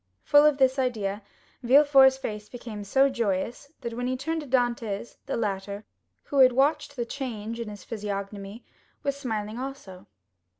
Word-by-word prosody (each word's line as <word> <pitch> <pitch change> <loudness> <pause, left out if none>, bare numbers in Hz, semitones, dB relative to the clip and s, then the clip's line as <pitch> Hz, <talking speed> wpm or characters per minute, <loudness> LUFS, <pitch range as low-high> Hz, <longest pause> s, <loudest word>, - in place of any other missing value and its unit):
Full 290 0 +6
of 300 -2 +2
this 265 0 +3
idea, 215 -5 -1 0.4
Villefort's 265 +1 +6
face 210 -5 -6
became 230 -4 -7
so 270 +7 +4
joyous, 235 +2 -2
that 235 -2 -4
when 245 +1 -3
he 255 0 -1
turned 320 +4 -2
to 295 - -9
Dantès, 240 -4 -1
the - - -2
latter, 200 -1 -3 0.4
who 280 - -1
had 255 -1 +7
watched 285 +2 +1
the 240 -3 -2
change 230 -3 -5
on 230 - -5
his 205 -1 -9
physiognomy, 200 0 -6 0.4
was 280 -1 0
smiling 220 -4 -4
also. 260 -9 -8
240 Hz, 160 wpm, -27 LUFS, 210-270 Hz, 0.4 s, had